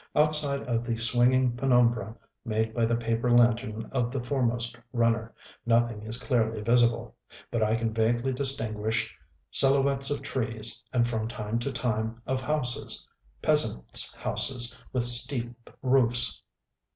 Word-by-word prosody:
Outside 150 -2 +2
of 120 -2 -2
the 115 -1 -3
swinging 120 +2 +2
penumbra 120 -4 +1 0.3
made 110 -1 -2
by 115 0 +1
the 115 +1 +1
paper 115 +1 -1
lantern 115 -2 +2
of 125 -3 -1
the 135 - -3
foremost 120 -2 -2 0.2
runner, 115 -1 0 0.3
nothing 115 -2 +1
is 110 +2 -3
clearly 115 -4 -1
visible; 120 +1 +1 0.4
but 115 - -1
I 110 +1 +2
can 115 -1 -2
vaguely 120 +4 0
distinguish 110 -5 -2 0.4
silhouettes 135 0 +4
of 145 - -2
trees 115 -3 -2
and, 120 -2 +1
from 110 -2 -2
time 115 0 -4
to 135 +4 -3
time, 115 -2 -2
of 130 0 -2
houses, 130 -4 -2 0.4
peasantsŌĆÖ - - +3
houses 125 -2 0
with 125 -2 0
steep 120 0 -1
roofs. 125 -2 +1
120 Hz, 135 wpm, -27 LUFS, 115-125 Hz, 0.4 s, silhouettes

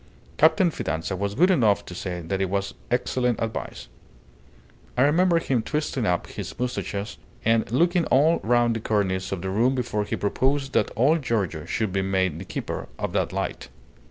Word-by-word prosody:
Captain 160 +3 +4
Fidanza 80 - -3
was 100 +2 -2
good 180 +6 +5
enough 110 - +3
to - - -8
say 90 -1 -4
that 95 +4 -2
it 95 - 0
was 100 +1 -2 0.2
excellent 125 -1 0
advice. 115 -1 -4 1.1
I 125 - +5
remember 170 +4 +4
him 135 -7 0
twisting 135 -3 -2
up 90 -1 +1
his - - -7
moustaches 115 -5 -3 0.3
and 115 0 +2
looking 170 +6 +3
all 155 +6 +4
round 120 0 +2
the - - -2
cornice 100 -4 -1
of 95 -2 -3
the 95 - -2
room 120 +7 +2
before 120 -4 -1
he - - -2
proposed 135 +6 0
that - - +2
old 150 +7 +3
Giorgio 95 - -1
should 100 +3 -2
be 95 - +1
made 95 -4 0
the 95 - -7
keeper - - -5
of - - -3
that - - 0
light." - - -4
115 Hz, 180 wpm, -25 LUFS, 95-135 Hz, 1.1 s, good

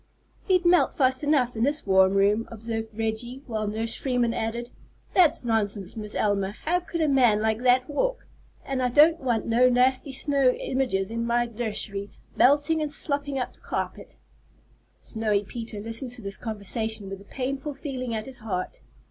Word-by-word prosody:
"He'd 365 -2 +2
melt 350 0 +4
fast 260 -2 +2
enough 275 -5 +2
in 220 - -3
this 290 +3 0
warm 190 0 +4
room," 205 +3 +3
observed 225 0 -4
Reggie, 230 +4 -3
while 215 -3 -3
Nurse 225 +2 -3
Freeman 245 -3 0
added: 235 +2 -3 0.4
"That's 345 -8 +4
nonsense, 205 -4 -1
Miss 210 -1 -7
Elma. 200 -1 0
How 350 +3 +2
could 345 -1 -4
a 310 - +3
man 250 -7 +4
like 220 0 0
that 250 0 +3
walk? - - -1 0.4
And 270 -1 -2
I 250 - +2
don't 310 +6 +5
want 240 -5 0
no 240 +2 +4
nasty 255 +3 +2
snow 270 -1 +2
images 225 -7 -1
in 230 0 -2
my 240 +1 +1
nursery, 210 -3 -4 0.3
melting 290 +4 +4
and 300 -1 -1
slopping 285 -2 -1
up 250 - -3
the - - -21
carpet." - - -5 0.8
Snowy 215 -3 -1
Peter 225 0 -6
listened 230 +4 -5
to 235 - -9
this 200 0 -4
conversation 220 0 -3
with 195 0 -7
a - - -15
painful 275 +4 -4
feeling 260 -4 -4
at 215 0 -4
his 260 -2 -7
heart. 190 -5 -4
240 Hz, 175 wpm, -26 LUFS, 215-270 Hz, 0.8 s, don't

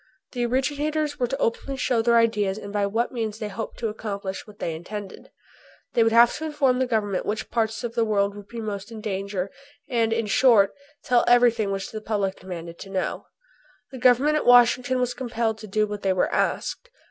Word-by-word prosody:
The 240 -2 -1
originators 290 +4 -1
were 245 - +1
to 270 - -3
openly 270 +2 -2
show 245 -3 +1
their 235 +1 +4
ideas 210 -4 +2
and 205 -1 -8
by 205 -1 +1
what 225 +4 -1
means 220 -4 -3
they 215 -1 -4
hoped 225 +2 -6
to 230 - -2
accomplish 200 -3 -5
what 210 -1 -14
they 165 - -3
intended. 195 +4 -8 0.6
They 235 - +3
would 225 0 +4
have 235 +1 +6
to 315 - -4
inform 280 -5 +1
the 260 - +1
Government 205 -5 0
which 210 +2 -4
parts 225 0 -1
of 235 -1 -3
the 235 -1 +1
world 200 -2 +1
would 205 -1 -11
be 235 +2 -7
most 205 0 -5
in 225 - -7
danger 195 -2 -3 0.4
and, 230 -4 +1
in 225 0 0
short, 210 -1 +4 0.3
tell 245 -1 +4
everything 240 -3 +4
which 195 0 -4
the 215 - -6
public 205 -3 -2
demanded 170 -2 -8
to 195 - -9
know. 190 -1 -3 0.6
The 260 - -8
Government 255 +5 +4
at - - -2
Washington 245 +1 +5
was 250 -1 0
compelled 235 -3 -2
to 215 - -9
do 215 +2 +1
what 210 -1 -6
they 190 -1 +1
were 185 - 0
asked. - - -1
225 Hz, 205 wpm, -24 LUFS, 205-245 Hz, 0.6 s, have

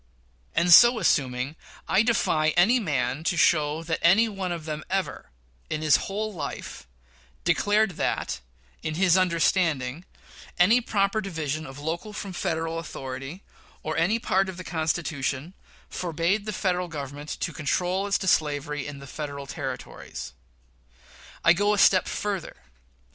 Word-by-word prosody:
And, 175 0 +5
so 240 +5 +9
assuming, 135 - +1 0.3
I 190 - +4
defy 160 -9 +2
any 225 +9 +5
man 140 - -1
to 175 - +1
show 155 0 +3
that 165 0 -2
any 195 +7 +5
one 195 -4 -4
of 170 -3 -5
them 155 -1 -4
ever, 185 -6 -2 0.4
in 155 0 -3
his 155 -2 +5
whole 210 +2 -3
life, 160 - -6 0.6
declared 210 0 +2
that, 65 - -1 0.4
in 155 - -3
his 180 0 +4
understanding, 170 -5 +1 0.5
any 215 +8 +5
proper 205 -1 0
division 155 -5 -3
of 135 +1 -10
local 165 +8 -4
from 200 -2 -6
Federal 165 -1 -2
authority, 135 +2 -7 0.4
or 155 - -3
any 175 +8 +2
part 195 -4 +1
of 185 - -7
the 185 - -7
Constitution, 160 -2 -2 0.3
forbade 175 +5 -1
the - - -1
Federal 180 -3 -1
Government 145 -1 -7
to 165 - -2
control 180 +6 -1
as 200 - +2
to 190 - -5
slavery 150 -3 0
in 145 -1 -7
the 140 - -10
Federal 140 0 -6
Territories. 130 - -7 1.1
I 170 - +8
go 205 +3 +2
a - - -4
step 185 -2 +5
further. 200 -3 -3
170 Hz, 145 wpm, -26 LUFS, 150-195 Hz, 1.1 s, so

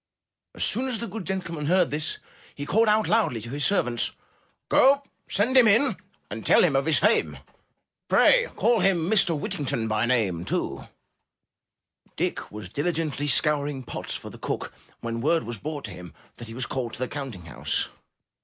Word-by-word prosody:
As - - -2
soon 255 +3 0
as 250 -3 0
the 235 - -4
good 210 -2 -6
gentleman 170 -6 -3
heard 180 -1 +3
this, 150 +1 -1 0.4
he 145 - -5
called 220 +8 +3
out 215 +1 +3
loudly 215 - +2
to 115 +2 -8
his 145 +1 -2
servants: 120 - +1 0.6
*'Go 275 +2 +5 0.3
send 230 +7 +1
him 250 -3 +8
in, 225 +2 +4 0.4
and 110 +1 -5
tell - - +5
him 160 -6 +3
of 135 +3 +1
his 160 - +4
fame; - - +2 0.7
Pray - - +5
call 235 -1 +3
him 175 -4 +2
Mr. 180 -5 +3
Whittington 130 -7 -2
by 110 +2 0
nameT' 100 -9 -1 1.3
Dick - - -3
was 105 -3 -8
diligently 150 - -2
scouring 145 -1 +2
pots - - -5
for - - -7
the - - -13
cook - - -4 0.3
when 115 0 -4
word 160 +4 +2
was 120 -3 -6
brought 150 +1 -5
to 105 - -7
him 90 -3 -11 0.2
that 120 - -9
he 115 - -9
was 125 0 -2
called 125 -4 -4
to - - -8
the 130 - -1
counting 130 - -7
house. 85 - -2
150 Hz, 175 wpm, -25 LUFS, 120-195 Hz, 1.3 s, him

